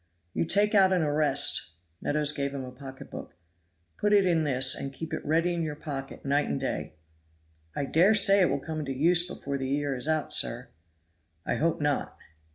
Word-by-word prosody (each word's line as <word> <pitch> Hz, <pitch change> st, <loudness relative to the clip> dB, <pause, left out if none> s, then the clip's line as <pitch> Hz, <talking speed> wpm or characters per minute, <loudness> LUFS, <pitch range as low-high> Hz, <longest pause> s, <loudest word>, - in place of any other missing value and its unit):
"You -, -, -1 dB
take 205 Hz, +5 st, +2 dB
out 190 Hz, -2 st, +5 dB
an 180 Hz, -3 st, +2 dB
arrest" 150 Hz, -, +2 dB, 0.3 s
Meadows 150 Hz, 0 st, +1 dB
gave 140 Hz, -1 st, -3 dB
him 135 Hz, -2 st, -5 dB
a 125 Hz, -, -9 dB
pocketbook 130 Hz, +1 st, -10 dB, 0.6 s
"put 210 Hz, 0 st, +1 dB
it 200 Hz, -2 st, +4 dB
in 165 Hz, -3 st, +1 dB
this, 130 Hz, -2 st, +3 dB
and 135 Hz, -, -4 dB
keep 160 Hz, +3 st, -7 dB
it -, -, -4 dB
ready 165 Hz, +3 st, +1 dB
in 170 Hz, -, -2 dB
your 155 Hz, -2 st, -3 dB
pocket 140 Hz, -3 st, -7 dB
night 145 Hz, +2 st, +1 dB
and -, -, -2 dB
day." 75 Hz, -, -4 dB, 0.8 s
"I 140 Hz, -, -2 dB
dare 180 Hz, +9 st, +3 dB
say 195 Hz, -1 st, +5 dB
it 180 Hz, -, +3 dB
will 140 Hz, -, 0 dB
come 155 Hz, +2 st, -6 dB
into 140 Hz, -3 st, -4 dB
use 175 Hz, +4 st, +3 dB
before 140 Hz, -5 st, -5 dB
the 130 Hz, 0 st, -3 dB
year 140 Hz, 0 st, -1 dB
is 125 Hz, +3 st, -5 dB
out, 155 Hz, -1 st, 0 dB
sir." -, -, +2 dB, 0.8 s
"I -, -, -1 dB
hope 165 Hz, 0 st, 0 dB
not." 145 Hz, -1 st, -2 dB
150 Hz, 195 wpm, -27 LUFS, 140-170 Hz, 0.8 s, out